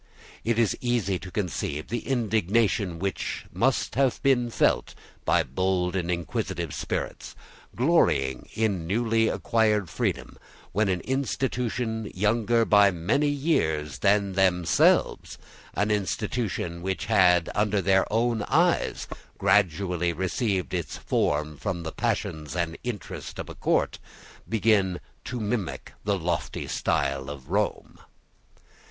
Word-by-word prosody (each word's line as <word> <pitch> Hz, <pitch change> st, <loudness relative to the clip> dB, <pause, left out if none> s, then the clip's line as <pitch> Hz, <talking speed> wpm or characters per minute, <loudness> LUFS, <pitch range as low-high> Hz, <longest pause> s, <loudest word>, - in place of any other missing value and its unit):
It 115 Hz, 0 st, 0 dB
is 115 Hz, -3 st, +2 dB
easy 115 Hz, -7 st, 0 dB
to 95 Hz, -, -9 dB
conceive 85 Hz, -6 st, -3 dB
the 120 Hz, 0 st, -3 dB
indignation 110 Hz, -5 st, +1 dB
which 95 Hz, +3 st, -3 dB
must -, -, +1 dB
have 135 Hz, 0 st, +2 dB
been 125 Hz, -3 st, +3 dB
felt -, -, +1 dB, 0.3 s
by -, -, +3 dB
bold 90 Hz, +5 st, 0 dB
and 90 Hz, -2 st, -1 dB
inquisitive 85 Hz, -, -2 dB
spirits, -, -, -4 dB, 0.4 s
glorying 115 Hz, -, +2 dB
in 100 Hz, -7 st, 0 dB
newly 115 Hz, +3 st, +2 dB
acquired 105 Hz, -6 st, +1 dB
freedom, -, -, -2 dB, 0.3 s
when 105 Hz, +1 st, +1 dB
an 90 Hz, -2 st, 0 dB
institution 125 Hz, -4 st, -2 dB
younger 115 Hz, +3 st, +2 dB
by 105 Hz, -2 st, +6 dB
many 100 Hz, -, +1 dB
years 80 Hz, -, 0 dB
than 100 Hz, +3 st, +2 dB
themselves, 90 Hz, -3 st, +2 dB, 0.4 s
an 105 Hz, +1 st, +1 dB
institution 105 Hz, -3 st, -2 dB
which 95 Hz, +2 st, -2 dB
had, 90 Hz, -6 st, +4 dB
under 105 Hz, -1 st, +1 dB
their 95 Hz, +1 st, +2 dB
own 115 Hz, 0 st, +1 dB
eyes, -, -, +2 dB, 0.3 s
gradually 90 Hz, -2 st, +2 dB
received 95 Hz, +2 st, -1 dB
its 85 Hz, -6 st, -3 dB
form 75 Hz, +1 st, 0 dB
from 90 Hz, -1 st, -3 dB
the 80 Hz, -, -4 dB
passions 75 Hz, 0 st, -2 dB
and 85 Hz, -2 st, -1 dB
interest 120 Hz, -5 st, -6 dB
of -, -, -6 dB
a -, -, -6 dB
court, -, -, 0 dB, 0.5 s
began 105 Hz, -5 st, +2 dB, 0.3 s
to 125 Hz, -, -4 dB
mimic 100 Hz, -, -3 dB
the 100 Hz, -1 st, +1 dB
lofty 85 Hz, -1 st, -2 dB
style 70 Hz, 0 st, -1 dB
of 70 Hz, -3 st, -9 dB
Rome. -, -, -1 dB
100 Hz, 120 wpm, -26 LUFS, 85-115 Hz, 0.5 s, by